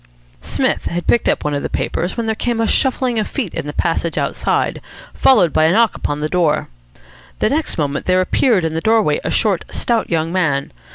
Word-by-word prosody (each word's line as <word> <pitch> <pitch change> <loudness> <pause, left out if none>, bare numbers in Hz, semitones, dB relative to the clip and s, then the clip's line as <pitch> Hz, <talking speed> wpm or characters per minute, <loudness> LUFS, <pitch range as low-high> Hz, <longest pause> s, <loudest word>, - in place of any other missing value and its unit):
Psmith - - -1
had 175 +1 -3
picked 235 - +2
up - - 0
one 150 - -1
of 145 - -1
the - - -3
papers 175 +6 -2
when 230 - -1
there 220 - 0
came 235 +1 -2
a 225 - +2
shuffling 255 -1 +1
of 215 - -1
feet 240 - -4
in - - -4
the - - -3
passage 165 +1 -1
outside, - - -1 0.3
followed 210 -11 +4
by 155 - +3
a 160 - +4
knock 225 +4 +3
upon 145 0 -3
the 150 - 0
door. 160 -3 0 0.7
The - - +1
next 300 +3 -1
moment 145 -3 -2
there 185 0 +3
appeared 185 0 +2
in 160 - -2
the 160 - -2
doorway 220 -7 +2
a - - -2
short, 200 -6 +1
stout 235 -2 -1
young 165 -1 0
man. 150 -7 0
180 Hz, 215 wpm, -18 LUFS, 160-225 Hz, 0.7 s, followed